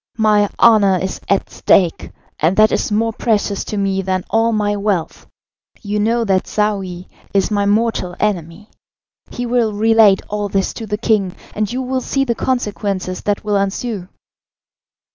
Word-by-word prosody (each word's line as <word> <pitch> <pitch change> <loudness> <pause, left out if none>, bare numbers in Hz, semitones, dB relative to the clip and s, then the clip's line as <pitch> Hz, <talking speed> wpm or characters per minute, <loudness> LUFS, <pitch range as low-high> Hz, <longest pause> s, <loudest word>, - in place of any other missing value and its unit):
My 210 -2 +3
honour 205 -5 +5
is 190 +1 -4
at 200 - 0
stake, 175 -4 +2 0.3
and 165 +5 +1
that 215 0 +5
is - - -1
more 225 +2 +1
precious 210 -3 0
to 210 - -4
me 195 -1 0
than 185 -1 -2
all 225 +1 +2
my 210 -1 0
wealth. 200 -5 -2 0.6
You 210 0 -2
know 230 +3 +1
that 190 -2 +1
Saouy 195 -4 -2 0.3
is 195 +2 +2
my 205 -1 +1
mortal 210 -4 0
enemy. 185 -1 -3 0.6
He 245 - -5
will 235 -3 +1
relate 220 -2 +4
all 205 0 -3
this 195 0 -1
to 225 - -7
the 210 0 -2
king, 210 -5 0 0.2
and 210 -1 -2
you 255 +2 -2
will 260 0 -2
see 275 +2 0
the 240 - 0
consequences 205 -7 -2
that 205 -1 -1
will 210 -1 +1
ensue." 200 0 -2
210 Hz, 160 wpm, -18 LUFS, 195-225 Hz, 0.6 s, honour